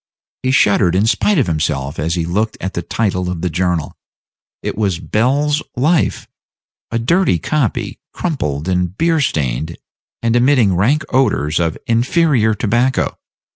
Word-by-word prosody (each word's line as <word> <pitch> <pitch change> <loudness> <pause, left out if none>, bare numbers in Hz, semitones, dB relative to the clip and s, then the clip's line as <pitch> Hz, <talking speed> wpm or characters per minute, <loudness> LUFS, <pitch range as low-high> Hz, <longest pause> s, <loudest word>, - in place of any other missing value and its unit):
He 130 - -1
shuddered 100 -8 +3
in 100 +3 +3
spite 120 - +2
of 135 - +3
himself 75 -4 -2
as 80 +3 -1
he 85 -2 -1
looked 105 +6 -1
at 95 - -4
the 85 - -2
title 90 -1 -1
of 90 -2 -4
the 90 -1 -1
journal; 85 -3 -1 0.7
it - - -3
was 100 -5 0
Bell's 140 - +1
Life 155 +6 +1 0.6
a 115 - -1
dirty 165 - +2
copy, 130 - -2
crumpled, 75 - -3
and 90 0 -1
beer 165 -2 +2
stained, 75 - -1 0.5
and 115 0 +2
emitting 120 -6 +3
rank 135 - +2
odors 105 - +1
of 85 -2 -1
inferior 120 -1 +2
tobacco. 120 +4 0
105 Hz, 145 wpm, -17 LUFS, 85-130 Hz, 0.7 s, shuddered